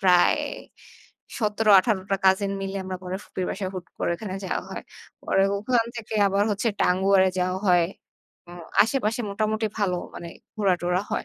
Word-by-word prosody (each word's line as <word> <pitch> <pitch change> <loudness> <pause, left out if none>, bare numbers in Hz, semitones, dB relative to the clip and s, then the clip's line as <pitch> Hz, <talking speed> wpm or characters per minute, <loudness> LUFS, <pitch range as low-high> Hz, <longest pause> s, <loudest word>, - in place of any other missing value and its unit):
প্রায় 180 -3 +5 1.0
১৭-১৮ 210 -2 +4
টা 195 - +3
কাজীন 190 +1 +3
মিলে 195 0 -4
আমরা 185 0 -4
পরে 185 0 -4
ফুপির 185 - -4
বাসায় 190 -1 -3
হুট 185 -1 -6
করে - - 0
ওখানে 190 0 -6
যাওয়া - - -2
হয়। - - -6 0.4
পরে 195 - +2 0.2
ওখান 230 +2 +1
থেকে 225 -1 -6
আবার 200 +1 +2
হচ্ছে 210 +3 0
টাঙ্গুয়ারে 190 +1 +4
যাওয়া 185 +1 0
হয়। 175 -2 +5 0.6
আ - - -11 0.3
আশেপাশে 225 -2 -1
মোটামুটি 215 +2 0
ভালো 190 -3 +1 0.2
মানে 170 - -7 0.3
ঘোরা-টোরা 180 -2 +1
হয়। - - -1
195 Hz, 155 wpm, -25 LUFS, 185-215 Hz, 1.0 s, প্রায়